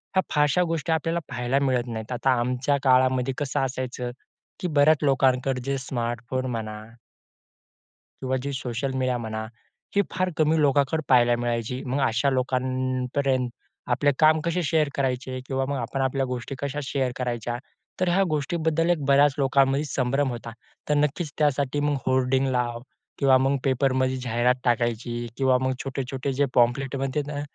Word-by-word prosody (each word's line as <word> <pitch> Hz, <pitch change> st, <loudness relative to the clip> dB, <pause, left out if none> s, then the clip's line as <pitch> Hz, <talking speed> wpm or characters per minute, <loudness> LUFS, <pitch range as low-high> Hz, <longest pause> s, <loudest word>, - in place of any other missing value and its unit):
ह्या 190 Hz, -, +5 dB
फारशा 150 Hz, +3 st, +3 dB
गोष्टी 165 Hz, 0 st, -2 dB
आपल्याला 165 Hz, +1 st, 0 dB
पाहायला 125 Hz, +2 st, 0 dB
मिळत 130 Hz, -3 st, 0 dB
नाहीत, 110 Hz, 0 st, -6 dB
आता 125 Hz, +2 st, 0 dB
आमच्या 125 Hz, +3 st, 0 dB
काळामध्ये 130 Hz, 0 st, +3 dB
कसं 145 Hz, -3 st, -1 dB
असायचं, 125 Hz, -1 st, -4 dB, 0.5 s
की 180 Hz, -, -2 dB
बऱ्याच 155 Hz, -1 st, +4 dB
लोकांकडे 130 Hz, -1 st, +2 dB
जे 135 Hz, 0 st, -1 dB
स्मार्टफोन 120 Hz, 0 st, -3 dB
म्हणा 110 Hz, -2 st, -4 dB, 1.4 s
किंवा 130 Hz, 0 st, 0 dB
जी 140 Hz, +1 st, -3 dB
सोशल 130 Hz, +1 st, -3 dB
मीडिया 130 Hz, -1 st, 0 dB
म्हणा, 110 Hz, -1 st, -4 dB, 0.5 s
ही 200 Hz, -, +5 dB
फार 185 Hz, 0 st, -1 dB
कमी 155 Hz, 0 st, +3 dB
लोकांकडे 145 Hz, +2 st, +2 dB
पाहायला 120 Hz, -2 st, +5 dB
मिळायची 120 Hz, +1 st, -2 dB
मग 130 Hz, +3 st, -1 dB
अशा 120 Hz, +5 st, +1 dB
लोकांपर्यंत 130 Hz, 0 st, 0 dB, 0.4 s
आपले 145 Hz, +4 st, +3 dB
काम 155 Hz, 0 st, +5 dB
कसे 170 Hz, +1 st, 0 dB
शेअर 155 Hz, -1 st, +2 dB
करायचे? 130 Hz, -1 st, -2 dB
किंवा 135 Hz, 0 st, -1 dB
मग 140 Hz, -, -1 dB
आपण 125 Hz, +3 st, -3 dB
आपल्या 135 Hz, 0 st, 0 dB
गोष्टी 125 Hz, +1 st, -4 dB
कशा 140 Hz, +1 st, -3 dB
शेअर 130 Hz, -2 st, -1 dB
करायच्या? 120 Hz, -2 st, -2 dB, 0.4 s
तर 185 Hz, -, +2 dB
ह्या 185 Hz, +3 st, +3 dB
गोष्टीबद्दल 160 Hz, +2 st, 0 dB
एक 160 Hz, -5 st, +1 dB
बऱ्याच 140 Hz, 0 st, +5 dB
लोकांमध्ये 135 Hz, +1 st, +3 dB
संभ्रम 135 Hz, 0 st, 0 dB
होता 120 Hz, -1 st, -6 dB, 0.4 s
तर 150 Hz, -, +3 dB
नक्कीच 150 Hz, +2 st, 0 dB
त्यासाठी 145 Hz, -1 st, +1 dB
मग 145 Hz, 0 st, +1 dB
होर्डिंग 130 Hz, +1 st, +2 dB
लाव 120 Hz, -1 st, -1 dB, 0.4 s
किंवा 135 Hz, -2 st, +5 dB
मग 135 Hz, +2 st, +2 dB
पेपरमध्ये 130 Hz, -1 st, +1 dB
जाहिरात 120 Hz, +1 st, +2 dB
टाकायची 120 Hz, 0 st, 0 dB
किंवा 130 Hz, -1 st, +3 dB
मग 130 Hz, 0 st, 0 dB
छोटे-छोटे 135 Hz, 0 st, -3 dB
जे 140 Hz, +2 st, +2 dB
पॅम्पलेट्स 130 Hz, +3 st, +2 dB
म्हणते 135 Hz, +2 st, -1 dB
ना, 145 Hz, -1 st, -4 dB
130 Hz, 155 wpm, -25 LUFS, 125-145 Hz, 1.4 s, ह्या